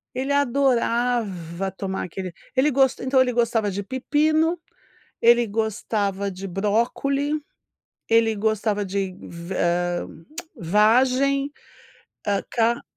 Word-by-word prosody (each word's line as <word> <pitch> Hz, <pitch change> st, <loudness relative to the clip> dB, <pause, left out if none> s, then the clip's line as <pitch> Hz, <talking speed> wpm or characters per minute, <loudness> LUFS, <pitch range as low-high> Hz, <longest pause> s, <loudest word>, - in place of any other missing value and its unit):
Ele 265 Hz, +2 st, -2 dB
adorava 235 Hz, -, +1 dB
tomar 190 Hz, 0 st, -4 dB
aquele 185 Hz, 0 st, -6 dB, 0.2 s
ele 275 Hz, +3 st, +3 dB, 0.3 s
então 260 Hz, +1 st, +2 dB
ele 255 Hz, -1 st, +3 dB
gostava 230 Hz, -3 st, +1 dB
de 200 Hz, +1 st, -4 dB
pepino, 310 Hz, -, +1 dB, 0.6 s
ele 235 Hz, 0 st, +5 dB
gostava 205 Hz, -2 st, -1 dB
de 190 Hz, +2 st, -7 dB
brócolis, 235 Hz, +9 st, 0 dB, 0.8 s
ele 225 Hz, -1 st, +3 dB
gostava 210 Hz, -1 st, 0 dB
de 190 Hz, -1 st, -2 dB
va 170 Hz, +2 st, -7 dB, 0.5 s
ah, -, -, -9 dB, 0.5 s
vagem, 255 Hz, -, +3 dB, 0.8 s
ah, 200 Hz, -1 st, +1 dB
ca 235 Hz, 0 st, +1 dB
225 Hz, 100 wpm, -23 LUFS, 200-260 Hz, 0.8 s, ele